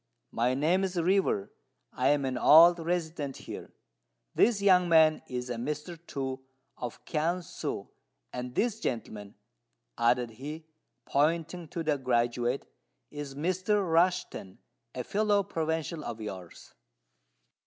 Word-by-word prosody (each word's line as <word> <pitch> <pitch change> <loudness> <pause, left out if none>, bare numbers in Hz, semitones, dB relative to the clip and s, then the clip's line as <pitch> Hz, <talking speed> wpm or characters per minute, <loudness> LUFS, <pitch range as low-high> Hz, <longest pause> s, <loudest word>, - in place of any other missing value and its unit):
My 125 +2 +1
name 165 +7 +2
is 185 -2 -1
River: 175 - +1 0.4
I 125 - +1
am 140 -1 +3
an 130 -1 -2
old 170 +7 +7
resident 160 -4 -2
here. - - -9 0.6
This 225 -2 +3
young 185 -3 +4
man 160 -1 +5
is 125 0 -4
a 120 -1 -4
Mr. 150 +7 -4
Tu, 130 -1 -4 0.3
of 120 -2 -7
Kiang 170 +3 -1
si; - - -5 0.5
and 125 0 -5
this 225 -1 0
gentleman," 110 - -4 0.6
added 120 0 +2
he, 150 +7 -8 0.4
pointing 165 +4 0
to 165 +2 -4
the 150 -3 0
graduate, 120 0 0 0.5
"is 145 -2 -7
Mr. 185 +6 0
Rushten, 170 - +1 0.4
a 125 - -3
fellow 205 - +2
provincial 160 -3 -3
of 115 -1 -6
yours." 95 -5 -9
150 Hz, 125 wpm, -29 LUFS, 125-175 Hz, 0.6 s, old